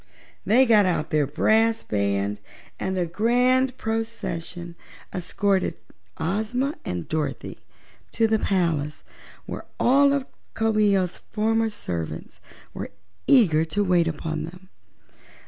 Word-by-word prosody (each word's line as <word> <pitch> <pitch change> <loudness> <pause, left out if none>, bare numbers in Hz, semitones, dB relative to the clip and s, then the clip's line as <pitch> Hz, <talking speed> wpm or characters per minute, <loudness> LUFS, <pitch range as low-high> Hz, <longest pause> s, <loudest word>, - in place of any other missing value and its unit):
They 250 +5 +6
got 215 -5 +5
out 170 -2 -1
their 150 -3 +2
brass 225 +9 +2
band 100 0 -1 0.4
and 190 0 -2
a 180 - +1
grand 250 +7 +2
procession 220 -6 -4 0.4
escorted 190 - 0 0.4
Ozma 220 - -1
and 90 -2 -4
Dorothy 155 -1 -3 0.5
to 225 - +3
the 220 0 +2
palace, 165 -7 0 0.4
where - - -6 0.2
all 280 +3 +5
of 280 -2 0 0.3
Coo 225 -1 +1
ee 205 -2 +4
oh's 185 -1 -2
former 225 +1 0
servants 85 - -6 0.3
were - - -5 0.4
eager 180 - +5
to 200 +6 0
wait 180 -3 +3
upon 160 0 -3
them. 180 +3 -13
195 Hz, 120 wpm, -24 LUFS, 160-225 Hz, 0.5 s, They